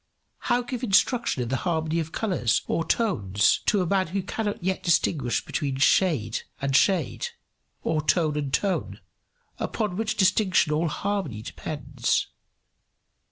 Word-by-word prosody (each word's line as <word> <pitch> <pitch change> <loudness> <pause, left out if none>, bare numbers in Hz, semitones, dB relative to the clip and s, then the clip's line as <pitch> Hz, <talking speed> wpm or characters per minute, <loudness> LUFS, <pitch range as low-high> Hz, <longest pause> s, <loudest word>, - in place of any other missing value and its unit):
How 245 0 +1
give 245 0 -5
instruction 235 - +2
in 120 - -5
the 130 - 0
harmony 160 -1 -1
of 160 0 -4
colours 180 - 0
or 165 - 0
tones 105 - +2
to 200 -3 +3
a - - -2
man 190 +1 +1
who 190 +3 -2
cannot 205 -1 -3
yet 190 +1 -1
distinguish 155 -6 +1
between 140 -3 -2
shade 140 - +2 0.2
and 135 -1 -1
shade 175 -2 +2 0.6
or 155 -1 0
tone 155 -1 +2
and 145 -2 -2
tone, 195 +6 -1 0.6
upon 210 -5 -2
which 220 0 -1
distinction 185 -5 +3
all 160 +3 +1
harmony 160 - -3
depends? 140 -1 -2
170 Hz, 140 wpm, -25 LUFS, 140-200 Hz, 0.6 s, to